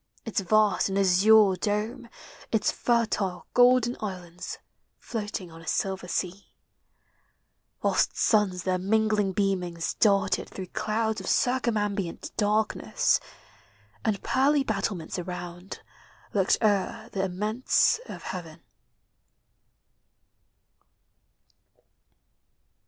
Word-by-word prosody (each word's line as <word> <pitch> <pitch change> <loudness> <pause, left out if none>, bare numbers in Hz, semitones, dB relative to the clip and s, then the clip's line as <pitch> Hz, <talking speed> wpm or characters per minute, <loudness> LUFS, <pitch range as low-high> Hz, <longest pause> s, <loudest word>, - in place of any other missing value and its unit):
Its 225 -1 -1
vast 205 0 +3
and 195 - -1
azure 200 +2 +5
dome 215 +6 -2 0.4
Its 220 -2 +2
fertile 215 -6 0
golden 245 -1 +5
islands 180 -4 -6 0.4
Floating 205 -6 -5
on 165 0 -12
a 165 - -15
silver 190 -1 -1
sea; 185 +2 -3 1.4
Whilst - - +1
suns 195 -5 +2
their 185 -1 0
mingling 210 0 +1
beamings 180 -4 -1
darted 200 -2 +2
Through 185 -2 -8
clouds 220 -1 -1
of 190 - -8
circumambient 210 -7 0
darkness. 210 0 +1 0.8
And 210 -3 -1
pearly 280 +2 +3
battlements 195 -7 -3
around 180 +1 -7 0.5
Looked 195 -2 +3
o'er 205 -3 0
the 195 - -2
immense 210 - +1
of - - -8
heaven. 165 -4 -7
200 Hz, 90 wpm, -27 LUFS, 185-220 Hz, 1.4 s, azure